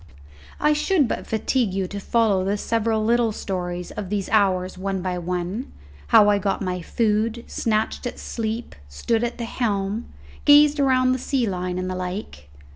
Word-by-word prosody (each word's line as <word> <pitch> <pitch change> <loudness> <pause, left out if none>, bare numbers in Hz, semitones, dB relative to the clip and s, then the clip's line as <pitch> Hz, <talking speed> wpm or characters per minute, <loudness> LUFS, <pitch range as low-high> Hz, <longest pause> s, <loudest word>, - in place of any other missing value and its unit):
I 300 0 +3
should 300 -1 +2
but - - -4
fatigue 220 -2 0
you 195 -1 0
to 200 - -5
follow 205 -3 +2
the 200 +2 0
several 220 0 0
little 235 0 +3
stories 180 -3 -4
of 205 -3 -6
these 200 -2 -2
hours 190 -3 +2
one 190 0 -3
by 180 -1 -2
one; 180 +7 -3 0.4
how 205 - +6
I 205 -1 +4
got 195 0 -1
my 180 -2 -3
food, 220 +4 0
snatched 220 +2 -1
at - - -6
sleep, 225 +1 -4 0.2
stood 220 - -1
at 240 - -2
the 235 - -4
helm, 210 -2 -2 0.3
gazed 295 0 +6
around 255 -2 +3
the 255 - 0
sea 255 -1 0
line 180 -2 -3
and 185 0 -2
the 185 - -2
like. 180 - -6
210 Hz, 175 wpm, -23 LUFS, 185-235 Hz, 0.4 s, how